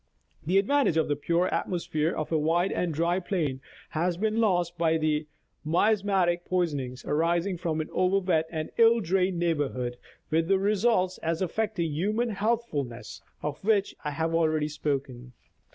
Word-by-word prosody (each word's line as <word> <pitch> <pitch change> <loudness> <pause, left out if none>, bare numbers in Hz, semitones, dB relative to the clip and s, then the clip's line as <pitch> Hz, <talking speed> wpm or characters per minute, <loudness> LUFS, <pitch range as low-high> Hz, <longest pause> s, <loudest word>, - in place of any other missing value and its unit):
The 180 +5 +2
advantage 215 - +3
of 160 - +2
the 145 - +2
pure 170 +5 +1
atmosphere 165 -3 -1
of 155 - -4
a 160 - +3
wide 170 +4 +1
and 175 -2 -1
dry 170 +4 +1
plain 160 -8 -2 0.3
has 170 +2 -1
been 215 +3 0
lost 175 -5 +1
by 165 -1 +2
the 155 -1 0 0.4
miasmatic 185 0 +2
poisonings 145 -9 -2
arising 170 +5 +1
from 160 -2 -1
an 155 - -6
over 185 +1 +2
wet 175 -5 +1
and 155 -2 -4
ill 230 0 +6
drained 185 -1 +1
neighborhood, 140 -8 -1 0.3
with 165 +1 +2
the 195 +1 +4
results, 195 -2 +1
as 165 +2 -1
affecting 185 -3 -1
human 210 +10 0
healthfulness, 200 - -2 0.2
of 150 +3 -4
which 205 -1 +2
I 150 - -1
have 160 +3 -2
already 155 -2 +1
spoken. 135 -4 -4
170 Hz, 155 wpm, -27 LUFS, 155-190 Hz, 0.4 s, ill